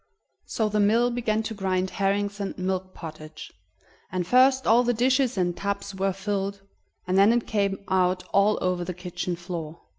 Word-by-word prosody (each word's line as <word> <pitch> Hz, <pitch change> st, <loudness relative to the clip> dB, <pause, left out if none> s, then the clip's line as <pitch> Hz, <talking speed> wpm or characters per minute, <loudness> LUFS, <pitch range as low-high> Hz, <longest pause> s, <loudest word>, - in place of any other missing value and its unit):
So 220 Hz, -, 0 dB
the 210 Hz, 0 st, 0 dB
mill 230 Hz, +4 st, +3 dB
began 225 Hz, -2 st, -1 dB
to 220 Hz, -, -4 dB
grind 190 Hz, -2 st, -1 dB
herrings 200 Hz, +1 st, -1 dB
and 200 Hz, -1 st, -4 dB
milk 185 Hz, 0 st, -3 dB
pottage, 155 Hz, -1 st, -9 dB, 0.6 s
and 180 Hz, -1 st, -2 dB
first 260 Hz, +5 st, +4 dB
all 230 Hz, +2 st, +5 dB
the 245 Hz, 0 st, +1 dB
dishes 255 Hz, 0 st, +2 dB
and 175 Hz, -2 st, 0 dB
tubs 200 Hz, +2 st, -3 dB
were 195 Hz, 0 st, 0 dB
filled, 195 Hz, 0 st, -3 dB, 0.4 s
and 185 Hz, +1 st, +2 dB
then 200 Hz, +3 st, +6 dB
it 235 Hz, 0 st, +1 dB
came 200 Hz, -2 st, 0 dB
out 185 Hz, -1 st, +1 dB
all 200 Hz, +2 st, +4 dB
over 180 Hz, -1 st, 0 dB
the 180 Hz, 0 st, -5 dB
kitchen 180 Hz, 0 st, -4 dB
floor. 170 Hz, -2 st, -7 dB
195 Hz, 175 wpm, -25 LUFS, 180-215 Hz, 0.6 s, then